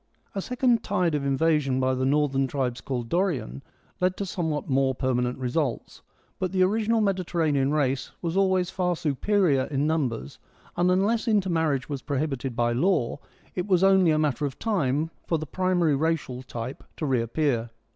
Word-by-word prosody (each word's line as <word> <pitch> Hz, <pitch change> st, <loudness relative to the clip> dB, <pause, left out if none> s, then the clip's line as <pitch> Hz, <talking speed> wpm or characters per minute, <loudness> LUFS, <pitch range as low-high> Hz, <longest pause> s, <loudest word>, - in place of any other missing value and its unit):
A 195 Hz, -, -2 dB
second 245 Hz, 0 st, +1 dB
tide 180 Hz, -5 st, 0 dB
of 145 Hz, -2 st, 0 dB
invasion 140 Hz, -1 st, +1 dB
by 130 Hz, 0 st, +2 dB
the 130 Hz, 0 st, 0 dB
northern 135 Hz, -1 st, +2 dB
tribes 130 Hz, -2 st, -2 dB
called 125 Hz, -3 st, -3 dB
Dorian 145 Hz, -, -1 dB, 0.4 s
led 185 Hz, 0 st, +1 dB
to 200 Hz, -, -2 dB
somewhat 160 Hz, -5 st, -2 dB
more 135 Hz, -1 st, +2 dB
per 130 Hz, +1 st, 0 dB
manent 125 Hz, 0 st, 0 dB
results, 130 Hz, +1 st, -2 dB, 0.4 s
but 185 Hz, -2 st, -1 dB
the 185 Hz, -1 st, +3 dB
original 220 Hz, +3 st, +2 dB
Mediterranean 165 Hz, -8 st, +1 dB
race 135 Hz, -3 st, 0 dB
was 170 Hz, 0 st, -3 dB
always 190 Hz, -2 st, +2 dB
far 180 Hz, -2 st, 0 dB
superior 160 Hz, -1 st, +1 dB
in 140 Hz, 0 st, -1 dB
numbers, 130 Hz, -, -2 dB, 0.4 s
and 175 Hz, +1 st, +2 dB
unless 205 Hz, +6 st, +2 dB
inter 205 Hz, -4 st, +2 dB
marriage 155 Hz, -5 st, 0 dB
was 140 Hz, -3 st, -4 dB
prohibited 135 Hz, -3 st, -2 dB
by 120 Hz, 0 st, +1 dB
law 140 Hz, 0 st, +1 dB, 0.3 s
it 180 Hz, +2 st, -3 dB
was 185 Hz, -2 st, +3 dB
only 190 Hz, -2 st, +5 dB
a 155 Hz, -, +3 dB
matter 150 Hz, -1 st, 0 dB
of 135 Hz, -, -9 dB
time 160 Hz, -, 0 dB, 0.2 s
for 165 Hz, -, +1 dB
the 155 Hz, -, -5 dB
primary 175 Hz, -2 st, +1 dB
racial 150 Hz, -4 st, -1 dB
type 125 Hz, 0 st, -7 dB
to 155 Hz, -, -2 dB
reappear. 120 Hz, -1 st, 0 dB
155 Hz, 170 wpm, -26 LUFS, 130-185 Hz, 0.4 s, only